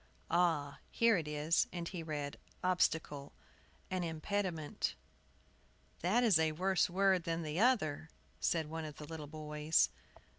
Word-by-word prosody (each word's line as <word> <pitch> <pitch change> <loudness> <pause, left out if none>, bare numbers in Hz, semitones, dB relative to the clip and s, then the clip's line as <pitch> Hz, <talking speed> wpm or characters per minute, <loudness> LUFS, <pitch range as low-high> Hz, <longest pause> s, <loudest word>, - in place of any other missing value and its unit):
"Ah, 165 -5 +2
here 230 -1 +4
it 165 -5 -2
is 150 +2 +2
" - - -32
And 170 -1 -4
he 180 -4 -5
read: 150 -3 -4 0.2
"OBSTACLE, 160 -5 0 0.6
an 185 -1 0
impediment." 165 -1 -2 1.0
"That 210 +9 +2
is 205 -9 +5
a 160 -1 +2
worse 185 +4 +2
word 190 -1 +3
than 165 0 -1
the 155 +2 -3
other," 180 - +2 0.3
said 165 -2 +1
one 160 +1 -4
of 150 -2 -7
the 150 - -8
little 155 -1 -7
boys. 150 - +1
160 Hz, 145 wpm, -35 LUFS, 150-185 Hz, 1.0 s, is